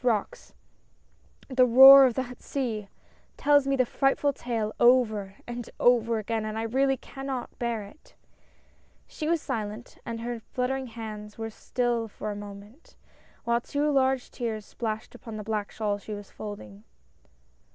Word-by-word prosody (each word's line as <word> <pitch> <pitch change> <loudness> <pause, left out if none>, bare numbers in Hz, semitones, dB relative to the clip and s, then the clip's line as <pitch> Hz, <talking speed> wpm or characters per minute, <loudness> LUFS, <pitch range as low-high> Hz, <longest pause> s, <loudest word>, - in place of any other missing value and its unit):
63 250 - +2
rocks - - -12 0.5
— - - -31
the 255 - +7
roar 270 +3 +10
of 240 - -2
that 250 -2 -4
sea 225 -7 -3 0.2
— - - -35
tells 290 -1 +4
me 275 - +2
the 255 -1 +3
frightful 275 +3 +1
tale 225 -4 -3
over 220 -6 +3
and 240 -1 -6
over 235 -2 +3
again, 220 +1 -2
and 215 0 -4
I 225 - -2
really 265 +4 +1
cannot 270 -1 -6
bear 235 -3 -2
it 205 +10 -16
I - - -42 0.5
" - - -36
She 305 - -5
was 330 -1 +1
silent, 220 -3 -5
and 230 -1 -5
her 240 0 -4
fluttering 255 +3 -3
hands 215 -2 -8
were 225 0 -5
still 240 0 -1
for 215 0 -6
a - - -5
moment, 205 +7 -11 0.5
while 235 0 +1
two 290 +4 -1
large 265 -2 +1
tears 220 -4 -4
splashed 220 -1 -5
upon 225 -2 -9
the 210 - -5
black 210 -1 -3
shawl 205 -2 -2
she 210 +1 -7
was 205 -1 -10
folding. 105 - -9
235 Hz, 170 wpm, -27 LUFS, 215-260 Hz, 0.5 s, roar